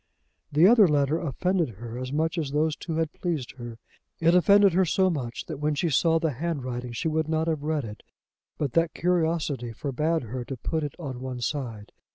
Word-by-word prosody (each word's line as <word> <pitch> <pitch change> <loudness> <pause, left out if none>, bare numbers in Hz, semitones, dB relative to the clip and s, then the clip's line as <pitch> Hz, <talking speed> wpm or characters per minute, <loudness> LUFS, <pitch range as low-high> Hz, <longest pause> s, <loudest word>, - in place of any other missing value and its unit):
The 155 +4 +5
other 215 -1 +7
letter 150 +1 +2
offended 170 - -1
her 115 +1 -7
as 130 +1 -5
much 160 +3 0
as 150 -4 -2
those 150 +2 +1
two 165 +1 -5
had 160 -1 -1
pleased 155 -8 -3
her. 120 -1 -7 0.4
It 165 +1 +4
offended 200 +1 +6
her 190 +2 +4
so 185 +2 +2
much 125 -7 -4
that - - -6
when 150 0 0
she 165 +3 0
saw 165 +4 +3
the 160 -1 0
handwriting 130 -4 -4
she 120 - -2
would 155 0 0
not 160 0 0
have 155 -3 0
read 150 -1 -1
it 105 -1 -9 0.6
but 140 -5 -2
that 165 0 +1
curiosity 160 -8 0
forbade 150 +5 -1
her 120 +2 -5
to 130 +2 -6
put 160 +7 -2
it 145 - -4
on 135 -7 -6
one 130 -1 -5
side. 120 -6 -4
155 Hz, 205 wpm, -26 LUFS, 130-165 Hz, 0.6 s, other